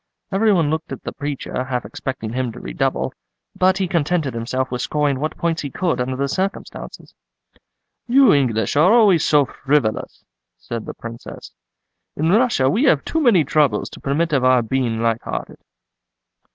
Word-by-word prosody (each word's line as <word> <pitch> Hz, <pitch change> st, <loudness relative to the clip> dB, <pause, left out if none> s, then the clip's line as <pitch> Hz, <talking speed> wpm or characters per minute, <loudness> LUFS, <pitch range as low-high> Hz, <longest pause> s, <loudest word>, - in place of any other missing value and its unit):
Every 210 Hz, +3 st, +3 dB
one 165 Hz, -6 st, +2 dB
looked 160 Hz, 0 st, -3 dB
at -, -, -7 dB
the -, -, -4 dB
preacher, 145 Hz, -2 st, -4 dB
half 125 Hz, -3 st, -3 dB
expecting 115 Hz, +1 st, -5 dB
him 130 Hz, -1 st, -2 dB
to -, -, -10 dB
redouble, -, -, -2 dB, 0.4 s
but 185 Hz, +1 st, +3 dB
he 190 Hz, -1 st, 0 dB
contented 160 Hz, -4 st, 0 dB
himself 125 Hz, +3 st, -2 dB
with 125 Hz, -1 st, -2 dB
scoring 145 Hz, -1 st, 0 dB
what 155 Hz, +2 st, -3 dB
points 170 Hz, -1 st, -1 dB
he 145 Hz, -, -4 dB
could 170 Hz, -1 st, -1 dB
under 130 Hz, +1 st, -2 dB
the 140 Hz, +2 st, -1 dB
circumstances." 190 Hz, +8 st, -5 dB, 0.9 s
"You 260 Hz, -2 st, +6 dB
English 115 Hz, -7 st, +1 dB
are 155 Hz, +7 st, +5 dB
always 210 Hz, -8 st, +5 dB
so 145 Hz, -2 st, +4 dB
frivolous," 135 Hz, -5 st, -1 dB, 0.3 s
said 115 Hz, -2 st, -6 dB
the -, -, -6 dB
Princess. 115 Hz, 0 st, -9 dB, 0.6 s
"In 160 Hz, +3 st, +1 dB
Russia 220 Hz, -, +3 dB
we 220 Hz, -, +2 dB
have 145 Hz, -, +3 dB
too 320 Hz, -, -1 dB
many 225 Hz, -, +5 dB
troubles 145 Hz, -6 st, +1 dB
to -, -, -11 dB
permit 155 Hz, +4 st, 0 dB
of 135 Hz, -3 st, +2 dB
our 130 Hz, -1 st, +4 dB
being 115 Hz, -1 st, -1 dB
light 115 Hz, -1 st, +1 dB
hearted." -, -, -6 dB
145 Hz, 170 wpm, -20 LUFS, 125-175 Hz, 0.9 s, You